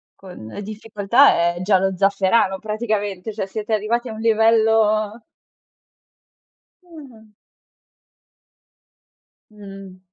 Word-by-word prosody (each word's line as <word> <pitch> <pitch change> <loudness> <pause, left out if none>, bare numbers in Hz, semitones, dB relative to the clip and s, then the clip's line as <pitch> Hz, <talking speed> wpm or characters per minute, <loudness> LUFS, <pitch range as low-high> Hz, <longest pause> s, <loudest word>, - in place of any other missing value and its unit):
con 180 - -12
le 205 - -8
difficoltà 210 -2 +2
è 175 - -7
Giallo 190 -1 +1
Zafferano 195 +1 +1
praticamente, 215 -2 -4
cioè 200 -2 -4
siete 215 +2 -5
arrivati 235 +4 -1
a - - -6
un 220 - -9
livello 220 -1 +2 1.6
Ah. 270 -11 -15 2.2
Mh. 195 -3 -12
215 Hz, 90 wpm, -20 LUFS, 195-225 Hz, 2.2 s, difficoltà